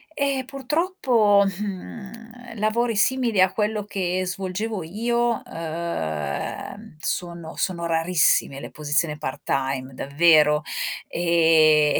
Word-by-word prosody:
Ehm 275 -2 0
purtroppo, 265 - +2
mhmm, 220 +5 -7
lavori 230 +2 +1
simili 235 0 +2
a 185 - +5
quello 210 0 -1
che 185 -2 -2
svolgevo 190 +3 -3
io, 235 +6 -1
ehm, 160 - -5
sono 170 -1 -4
sono 170 -2 -2
rarissime 165 -4 +2
le - - -8
posizioni 150 +1 -1
part 145 - -5
time 135 -1 -2
davvero, 150 +1 +4 0.4
e 160 -3 +4
185 Hz, 100 wpm, -23 LUFS, 155-225 Hz, 0.4 s, a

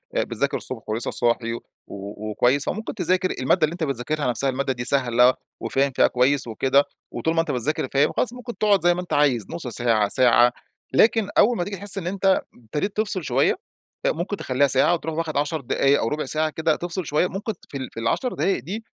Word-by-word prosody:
آآ - - +2
بتذاكر - - -1
الصبح - - -5
ولسه 110 +2 -1
صاحي 115 -1 +1
و 115 - -5 0.3
وكويس 110 +7 -1
فممكن 220 +3 -4
تذاكر، 185 -1 +1
المادة 155 +6 +2
اللي 155 - -5
أنت 170 -1 -4
بتذاكرها 140 +1 -2
نفسها 135 +3 0
المادة 135 +1 -1
دي 120 -1 -5
سهلة 125 -2 +4 0.3
وفاهم 140 +1 0
فيها - - +5
كويس 130 +1 +1
وكده، 135 +5 +2 0.3
وطول 160 - -1
ما - - +2
أنت 165 - -3
بتذاكر 130 +3 -1
فاهم، 140 +2 +3
خلاص 240 - 0
ممكن 245 -1 -8
تقعد 205 -3 +3
زي 175 0 +5
ما 175 - -3
أنت 180 - -6
عايز 135 -7 +2
نُص 165 -5 -6
ساعة، 115 -3 +1
ساعة، 120 +2 +5 0.4
لكن 215 - +3
أول 235 +2 +5
ما - - 0
تيجي 200 +3 -5
تحس 200 +1 +2
إن 180 -3 -3
أنت 190 0 +2
ابتديت 150 - -4
تفصِل 205 -4 -1
شوية، - - +2 0.5
آآ - - +4
ممكن 175 +5 -3
تخلّيها 135 -1 +1
ساعة 135 +5 +3
وتروح 160 -2 -3
واخد 160 -2 -2
10 150 +2 -1
دقايق 135 +2 +2
أو - - 0
رُبع 150 +5 -2
ساعة 155 0 0
كده 160 0 0
تفصِل 175 +1 -4
شوية، 150 +5 +1
ممكن 205 +4 -4 0.2
في 140 - -6
ال 130 -1 -6
في - - -6
ال10 175 - -1
دقايق 195 - 0
دي 205 - -5
150 Hz, 210 wpm, -23 LUFS, 125-180 Hz, 0.5 s, فيها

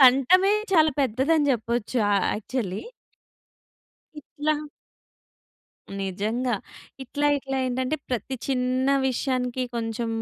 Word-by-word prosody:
కంఠమే 275 +10 +6 0.2
చాలా 315 -3 +5
పెద్దదని 280 +4 +2
చెప్పొచ్చు. 235 +1 -1
ఆహ్, 200 - +2
యాక్చువల్లీ. 210 -3 -3 1.4
ఇట్లా 300 +1 -2 1.5
నిజంగా. 220 +6 -1 0.5
ఇట్లా, 290 +3 -1
ఇట్లా 270 0 -4
ఏంటంటే 255 +4 -1
ప్రతి 250 +2 -2
చిన్న 255 0 0 0.2
విషయానికి 255 -1 -1
కొంచెం 230 0 -2
255 Hz, 90 wpm, -25 LUFS, 235-275 Hz, 1.5 s, కంఠమే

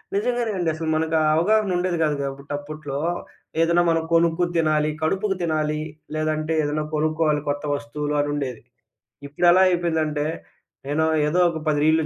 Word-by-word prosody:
నిజంగానే 240 +2 0
అండి, 175 -3 0
అసలు 160 0 -4
మనకా 160 0 +1 0.2
అవగాహన 205 +4 +2
ఉండేది 180 -1 0
గాదు 150 -1 +1
గాబట్టి 140 0 -6
అప్పట్లో 145 -1 -6 0.6
ఏదైనా 170 +1 +3
మనం 165 -1 +1
కొనుక్కు 165 +1 +3
తినాలి. 155 -1 +2
కడుపుకి 195 +5 0
తినాలి. 155 -2 0 0.3
లేదంటే 155 0 -1
ఏదన్నా 150 +1 -1
కొనుక్కోవాలి 155 -1 +1
కొత్త 145 +1 -2
వస్తువులు 145 +1 -4
అనుండేది. 145 -4 -3 0.6
ఇప్పుడెలా 175 +6 +4
అయిపోయిందంటే, 160 -4 0 0.6
నేను 155 +3 +1 0.2
ఏదో 165 +4 +1
ఒక 165 - -5
10 150 -1 +1
రీల్లు 160 0 +3
155 Hz, 140 wpm, -23 LUFS, 150-170 Hz, 0.6 s, ఇప్పుడెలా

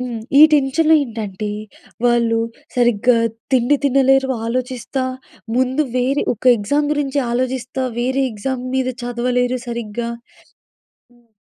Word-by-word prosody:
హ్మ్. 245 -3 -4 0.2
ఈ - - +8
టెన్షన్‌లో 300 +3 +3
ఏంటంటే, 215 -5 -5 0.6
వాళ్ళు 235 -1 +3 0.4
సరిగ్గా 240 0 +3 0.4
తిండి 255 +3 +3
తినలేరు 270 0 +3 0.2
ఆలోచిస్తా. 255 +2 -3 0.5
ముందు 260 +3 +1
వేరే 260 +3 +1
ఒక 220 - -19
ఎగ్జామ్ 285 +8 0
గురించి 290 -1 -1
ఆలోచిస్తా, 255 +1 -2 0.2
వేరే 260 +3 0
ఎగ్జామ్ 250 +4 -4
మీద 260 -1 0
చదవలేరు 245 +1 0
సరిగ్గా. 235 -1 -4 1.1
హ్మ్ 240 -1 -28
250 Hz, 110 wpm, -19 LUFS, 235-265 Hz, 1.1 s, ఈ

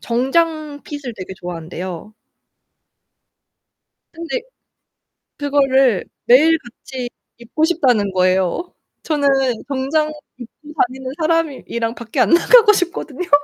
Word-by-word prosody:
정장 295 +4 0
핏을 285 -5 -6
되게 190 -1 -8
좋아한대요. 175 +3 -7 2.0
근데 335 +9 -4 1.0
그거를 270 -6 +2 0.2
매일 310 +7 +6
같이 245 0 -8 0.3
입고 240 +7 -1
싶다는 250 - +2
거예요. 185 - +1 0.3
저는 295 -3 0 0.4
정장 285 +3 0 0.3
입고 295 +5 -12
다니는 260 0 -7
사람이 325 -3 0
이랑 230 0 -2
밖에 230 -2 -5
안 - - +3
나가고 425 +5 +6
싶거든요. 355 -2 -3
270 Hz, 230 characters per minute, -19 LUFS, 230-315 Hz, 2.0 s, 매일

